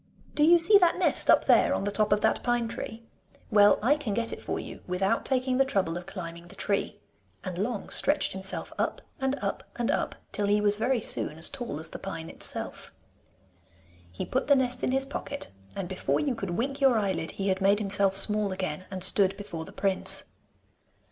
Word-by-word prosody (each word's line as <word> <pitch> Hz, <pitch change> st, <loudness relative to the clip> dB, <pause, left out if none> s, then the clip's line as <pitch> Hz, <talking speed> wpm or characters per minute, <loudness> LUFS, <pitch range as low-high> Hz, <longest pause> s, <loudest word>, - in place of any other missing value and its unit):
Do -, -, -2 dB
you 340 Hz, +3 st, +7 dB
see 395 Hz, +5 st, +6 dB
that 350 Hz, -2 st, +3 dB
nest -, -, +1 dB
up -, -, +5 dB
there -, -, +4 dB
on -, -, -2 dB
the 205 Hz, -, -1 dB
top 210 Hz, 0 st, +1 dB
of 210 Hz, 0 st, +3 dB
that 220 Hz, -, +1 dB
pine 240 Hz, -1 st, 0 dB
tree? 225 Hz, 0 st, -7 dB, 0.5 s
Well, 205 Hz, -1 st, +6 dB
I 285 Hz, +6 st, +3 dB
can 235 Hz, -9 st, -3 dB
get 230 Hz, 0 st, -1 dB
it -, -, -8 dB
for -, -, -3 dB
you -, -, -9 dB
without 190 Hz, +5 st, 0 dB
taking 255 Hz, -1 st, 0 dB
the -, -, +6 dB
trouble 195 Hz, -10 st, -1 dB
of 175 Hz, +1 st, -7 dB
climbing 170 Hz, -3 st, -8 dB
the -, -, -9 dB
tree,' 200 Hz, -1 st, -2 dB, 0.4 s
and 185 Hz, -2 st, -5 dB
Long 210 Hz, +1 st, -3 dB
stretched 290 Hz, +1 st, +2 dB
himself 190 Hz, 0 st, -5 dB
up -, -, -2 dB, 0.2 s
and 265 Hz, +1 st, 0 dB
up -, -, -3 dB
and -, -, -1 dB
up, -, -, -1 dB, 0.2 s
till 205 Hz, -, -1 dB
he 205 Hz, +1 st, +3 dB
was 205 Hz, 0 st, +2 dB
very 245 Hz, +2 st, 0 dB
soon 155 Hz, -, -2 dB
as 165 Hz, -, +1 dB
tall 240 Hz, -, -5 dB
as 160 Hz, -, -3 dB
the -, -, -8 dB
pine 165 Hz, -4 st, -6 dB
itself. -, -, -4 dB, 1.2 s
He 90 Hz, -, -5 dB
put 260 Hz, -, -2 dB
the 285 Hz, -, +6 dB
nest 255 Hz, -1 st, 0 dB
in -, -, +1 dB
his 270 Hz, +1 st, 0 dB
pocket, 285 Hz, +1 st, -6 dB, 0.3 s
and 195 Hz, -2 st, -4 dB
before 190 Hz, 0 st, -1 dB
you 285 Hz, -4 st, 0 dB
could 195 Hz, -5 st, -5 dB
wink 275 Hz, +4 st, -3 dB
your 265 Hz, -4 st, +4 dB
eyelid 190 Hz, -6 st, -1 dB
he 195 Hz, 0 st, -2 dB
had 190 Hz, +1 st, -1 dB
made 200 Hz, +1 st, +4 dB
himself 200 Hz, -2 st, +1 dB
small 210 Hz, 0 st, +4 dB
again, 185 Hz, -2 st, -4 dB
and 190 Hz, -2 st, -3 dB
stood 195 Hz, 0 st, +5 dB
before 170 Hz, -6 st, -7 dB
the -, -, -11 dB
prince. 195 Hz, -2 st, +2 dB
205 Hz, 210 wpm, -27 LUFS, 190-255 Hz, 1.2 s, you